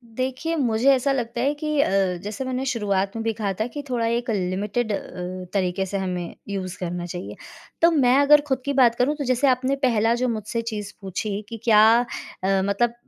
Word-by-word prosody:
देखिए, 260 +6 -2
मुझे 245 -2 +2
ऐसा 270 +2 +1
लगता 240 -2 -2
है 280 +3 +2
कि 305 -1 -2
अ, - - +1 0.3
जैसे 215 +5 -4
मैंने 260 +1 -2
शुरुआत 200 -5 -1
में 225 - -3
भी 225 -1 0
कहा 205 -2 -2
था 225 - 0
कि 290 +3 -7
थोड़ा 235 -2 0
एक 235 +1 -1
लिमिटेड 205 +4 -1
अ, 185 -2 -5
तरीके 190 -1 0
से 200 +1 -3
हमें 180 -3 -3 0.2
यूज़ 185 -2 -4
करना 175 -1 -4
चाहिए। 175 +1 -6 0.5
तो 335 - +6
मैं 265 -4 +4
अगर 290 +1 +6
खुद 265 -2 0
की 280 - 0
बात 245 -3 +4
करूँ 275 +5 +1
तो 290 - -4
जैसे 255 +2 +2
आपने 260 +1 +2
पहला 225 -1 +3
जो - - +2
मुझसे 225 +1 -3
चीज़ 210 -3 -5
पूछी 200 +2 -3
कि 230 - -6
क्या 215 -2 +6 0.6
अ, 195 0 +2
मतलब 235 +4 +1
230 Hz, 200 wpm, -23 LUFS, 195-260 Hz, 0.6 s, तो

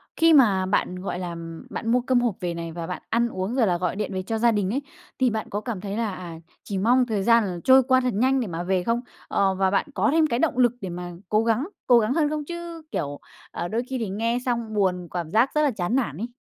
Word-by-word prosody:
khi 330 0 +5
mà 205 -10 +5
bạn, 185 -1 0
gọi 190 - -4
là, 180 -1 -4
ừm, 165 -1 -8
bạn 225 - -3
mua 245 +1 +3
cơm 255 0 +2
hộp 235 -5 0
về 175 -2 -2
này, 170 0 -5
và 165 0 -6
bạn 180 - -5
ăn 235 +1 +2
uống 190 +5 -3
rồi 235 -6 +3
là 175 - +2
gọi 180 +1 -2
điện 210 -1 -3
về 185 0 -2
cho 225 +3 -2
gia 235 +1 +4
đình 205 -3 0
ấy, 275 - 0 0.4
thì 255 -2 +4
bạn 220 0 -3
có 205 - -3
cảm 220 -5 -5
thấy 205 0 -4
là, 225 -4 -1
à, 170 -3 -8 0.2
chỉ 200 - -4
mong 245 +6 +3
thời 215 -5 -1
gian 230 0 +5
là 180 -2 -4
trôi 260 0 +7
qua 260 0 +3
thật 250 -2 0
nhanh 260 +6 +2
để 240 - -2
mà 170 -1 -4
về 185 0 0
không? 230 +4 0 0.3
Ờ, 195 -1 +1
và 190 0 +1
bạn 195 - +2
có - - +2
thêm 315 0 +4
cái 235 -4 -1
động 290 -4 +1
lực 245 -2 +5
để 190 - -4
mà 175 0 -6 0.2
cố 215 +1 +3
gắng 230 +7 +1 0.2
cố 245 -2 +7
gắng 225 +3 +1
hơn 300 -1 +2
không? 300 -1 -3
Chứ, 340 -1 -7
kiểu, 145 -2 -3 0.3
ờ, 175 - -4
đôi 225 +5 -1
khi 265 - -2
thì 225 -5 -3
nghe 230 +4 0
xong 235 -3 -2
buồn, 180 -4 0
cảm 170 -2 -4
giác 230 +5 +4
rất 300 - +3
là 295 -2 +3
chán 210 +2 -2
nản 155 - -1
ấy. 225 +6 -3
220 Hz, 280 wpm, -24 LUFS, 185-250 Hz, 0.4 s, trôi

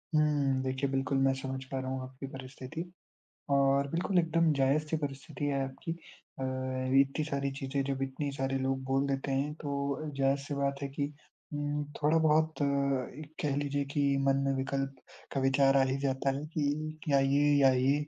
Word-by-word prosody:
हुँ, 145 -3 +3
देखिए 130 +1 -1
बिल्कुल, 135 0 0
मैं 135 0 +4
समझ 130 0 -4
पा 135 - -1
रहा 130 0 -3
हूँ 130 0 -2
आपकी 130 +1 -8
परिस्थिति 135 +4 -7 0.7
और 140 0 +4
बिल्कुल 180 +2 +2
एकदम 165 -1 +3
जायज़-सी 150 +3 +2
परिस्थिति 140 0 -4
है 140 -1 +1
आपकी। 135 +5 -5 0.5
अ, - - -2 0.6
इतनी 140 +3 +2
सारी 140 -2 -1
चीज़ें, 135 +1 -1
जब 135 0 -2
इतने 135 +2 -3
सारे 135 -1 -1
लोग 130 0 -1
बोल 135 +1 +2
देते 135 0 -1
हैं 140 +2 0
तो 140 -1 -1
अ, 155 +2 -5
जायज़-सी 135 +1 +1
बात 140 0 -1
है 140 - -1
कि 140 +1 -2 0.4
उम, 145 0 -1 0.2
थोड़ा-बहुत 155 0 +3
अ, - - +4 0.5
एक 155 0 -10
कह 145 -4 0
लीजिए 145 0 -1
कि 140 -1 +3
मन 135 0 +4
में 135 - +2
विकल्प 135 +1 -2 0.4
का 135 - 0
विचार 135 +1 +4
आ 135 - +5
ही 135 0 0
जाता 135 0 +1
है 145 - -5
कि 155 +1 -1
या 140 -1 +5
ये, 135 +1 +3 0.2
या 135 -1 +7
ये। 135 +3 +2
140 Hz, 185 wpm, -31 LUFS, 135-145 Hz, 0.7 s, या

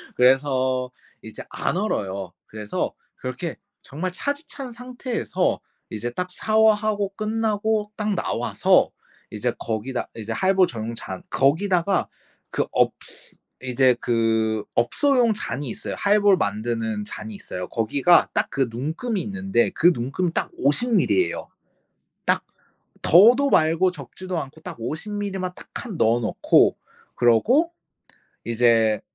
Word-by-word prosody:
그래서 130 -1 +2 0.3
이제 - - -9
안 175 - -2
얼어요. 100 - -2
그래서 105 -1 -3 0.2
그렇게 130 +7 -5 0.2
정말 170 +6 -4
차디 285 - -3
찬 270 -4 -7
상태에서 250 0 -2 0.3
이제 110 +3 -3
딱 180 +9 -4
샤워하고 215 -1 +2
끝나고 215 -1 -1
딱 210 -2 -1
나와서 - - +2 0.4
이제 - - -2
거기다 115 +3 -3
이제 115 0 -6
하이볼 190 +5 +3
전용 115 0 -5
잔 95 -5 -7
거기다가 175 +6 +2 0.4
그 - - -1
업ㅅ - - -2 0.3
이제 130 0 +3
그 110 -2 +1
업소용 240 - +2
잔이 145 - -4
있어요. - - -5
하이볼 205 -1 +4
만드는 110 -1 -2
잔이 105 0 -7
있어요. 90 -2 -6
거기가 135 +10 +3
딱 - - +1
그 135 -2 0
눈금이 160 - -3
있는데 195 -9 0
그 175 +2 +4
눈금 140 +8 -2
딱 - - -1
50 225 - +1
밀리예요. 365 - +1 0.8
딱 - - +2 0.6
더도 245 +10 +6
말고 165 +4 +3
적지도 185 0 -7
않고 155 +2 -8
딱 - - -7
50 160 - -5
밀리만 195 -3 -3
딱 - - -13
칸 220 -8 -6
넣어 115 -3 +3
놓고 110 - +3 0.4
그러고 240 - +3 0.7
이제 115 -2 +3
160 Hz, 255 characters per minute, -23 LUFS, -, 0.8 s, 더도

